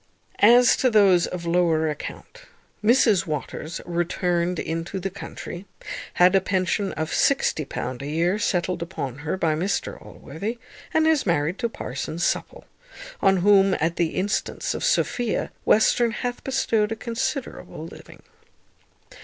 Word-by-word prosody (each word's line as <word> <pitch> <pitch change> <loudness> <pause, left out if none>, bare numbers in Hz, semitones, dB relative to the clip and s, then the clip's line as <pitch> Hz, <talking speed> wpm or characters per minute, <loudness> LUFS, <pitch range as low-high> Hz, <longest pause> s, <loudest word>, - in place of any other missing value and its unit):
As 240 +3 +6
to 255 - +3
those 195 -6 +4
of 175 -1 -6
lower 170 -2 +2
account, 155 - -7 0.4
Mrs 220 -5 +4
Waters 155 +1 -5
returned 175 0 -1
into 165 +5 -3
the 195 +1 -4
country, 190 -1 -8 0.5
had 180 +1 +5
a 195 - +4
pension 190 +1 0
of 160 0 -3
£60 140 - 0
a 140 - -5
year 170 +7 0
settled 180 -3 -1
upon 145 -7 -5
her 155 +5 -3
by 165 -4 +1
Mr 180 +6 -2
Allworthy, 200 - -6 0.3
and 315 0 +2
is 315 -7 +2
married 165 +2 0
to 235 -2 -1
Parson 145 - -5
Supple, 175 - -2 0.6
on 195 0 +4
whom, 195 -2 +5
at 165 +2 0
the 170 -2 0
instance 205 +3 -1
of - - -5
Sophia, 245 -3 0
Western 235 +2 +4
hath 245 +2 -4
bestowed 230 -5 0
a - - -1
considerable 245 +4 -4
living. - - -13
185 Hz, 135 wpm, -24 LUFS, 165-220 Hz, 0.6 s, As